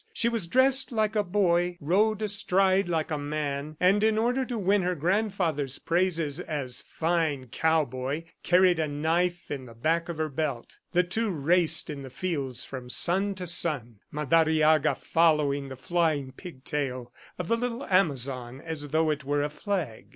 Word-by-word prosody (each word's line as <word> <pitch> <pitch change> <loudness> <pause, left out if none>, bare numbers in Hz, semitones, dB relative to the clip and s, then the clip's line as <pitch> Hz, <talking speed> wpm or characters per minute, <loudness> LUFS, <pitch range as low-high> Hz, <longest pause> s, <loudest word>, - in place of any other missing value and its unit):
She 235 - +2
was 225 -7 -2
dressed 260 +5 +4
like 220 -2 0
a 210 - +2
boy, 175 -2 +1
rode 210 +7 +1
astride 195 -2 +2
like 160 -2 -1
a 150 - -1
man, 145 0 -4
and 195 +3 +3
in 220 0 +3
order 245 +4 +1
to 245 -2 -4
win 200 0 +2
her 180 0 -1
grandfather's 170 -5 -1
praises 165 -4 0
as 140 -8 -3
"fine 160 -6 -1
cowboy," 145 -1 0 0.2
carried 180 -1 +4
a 155 - 0
knife 165 +4 -1
in 135 -3 -5
the 115 - -13
back 165 +8 0
of 170 - -4
her 155 0 -1
belt. 140 -4 -4
The 180 +1 +3
two 220 +6 -1
raced 170 +1 +2
the 140 -3 -7
fields 135 -6 -3
from 130 -2 -8
sun 195 +8 +2
to 185 -1 -6
sun, 145 - +1
Madariaga 155 0 +3
following 150 -4 +1
the 130 - -7
flying 155 -1 -1
pigtail 130 -5 -5 0.2
of 180 - -4
the 230 - +2
little 245 +2 -3
Amazon 135 -8 0
as 155 -1 -4
though 155 +2 +1
it 150 -1 -3
were 145 +1 0
a 145 - -3
flag. 165 - -4
160 Hz, 165 wpm, -27 LUFS, 145-185 Hz, 0.2 s, dressed